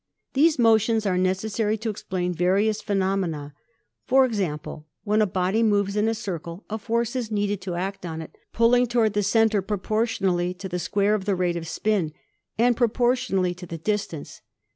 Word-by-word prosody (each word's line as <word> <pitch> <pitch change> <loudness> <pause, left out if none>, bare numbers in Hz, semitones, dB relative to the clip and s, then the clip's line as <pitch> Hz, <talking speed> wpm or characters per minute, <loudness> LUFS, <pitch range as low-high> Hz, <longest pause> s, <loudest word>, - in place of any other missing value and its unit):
These 305 +3 +4
motions 225 -2 +3
are 190 -2 +1
necessary 205 +4 0
to 220 +1 -3
explain 180 -3 -3
various 200 +5 +1
phe 205 -2 -2
nomena. 185 -7 -1 0.5
For 265 +1 +5
example, 155 -9 -3 0.2
when 210 +1 +2
a 210 - +3
body 190 +4 0
moves 205 -2 +2
in 210 +1 +2
a 225 - +1
circle 170 -2 -6
a 220 - -2
force 235 +2 -1
is 245 -4 -2
needed 205 -2 -1
to 180 -2 -4
act 190 +3 -4
on 160 -2 -5
it, 160 - -9 0.2
pulling 245 +2 +4
toward 230 -3 +2
the 205 - +1
center 220 0 +3
pro 205 +2 -2
portionally 190 -4 0
to 190 - -6
the 180 -1 -3
square 200 +4 +1
of 205 -3 -1
the 200 -2 +1
rate 175 -1 0
of 165 -1 -5
spin 170 -2 0 0.4
and 240 +2 +3
propor 240 +1 +2
tionally 195 -8 -1
to 180 -1 -9
the 165 - -6
distance. 185 -4 -3
205 Hz, 185 wpm, -24 LUFS, 180-220 Hz, 0.5 s, For